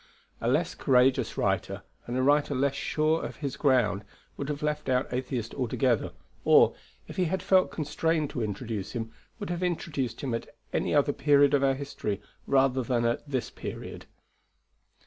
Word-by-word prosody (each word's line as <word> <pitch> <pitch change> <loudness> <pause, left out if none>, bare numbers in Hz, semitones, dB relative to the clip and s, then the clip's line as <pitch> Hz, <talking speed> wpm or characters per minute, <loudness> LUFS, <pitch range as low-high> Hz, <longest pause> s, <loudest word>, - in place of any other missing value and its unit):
A - - -1
less - - +1
courageous 130 -1 +2
writer, - - -1 0.2
and 120 +1 -2
a 130 - +1
writer 145 +1 +3
less 135 +1 +1
sure 155 +3 0
of - - -5
his 140 -3 -4
ground, 125 -9 +2 0.3
would 140 - -5
have 150 0 -3
left 150 -2 -1
out 125 0 +1
Atheist 125 -3 -3
altogether; 125 -2 0 0.3
or, - - +6 0.3
if - - -10
he 185 - +2
had 185 +2 -2
felt 185 -1 +4
constrained 155 0 -1
to 125 - -3
introduce 105 -1 -4
him, 115 -2 -4 0.3
would 205 -5 -5
have 175 0 -3
introduced 150 -9 -2
him 130 -4 -2
at 115 - -4 0.2
any - - 0
other - - +3
period 145 -1 +4
of 140 -1 +3
our 135 -1 +3
history 130 -7 -4 0.3
rather 135 -1 +3
than 120 -1 0
at 120 +5 -1
this 130 -3 -2
period. - - -7
135 Hz, 170 wpm, -28 LUFS, 125-150 Hz, 0.3 s, or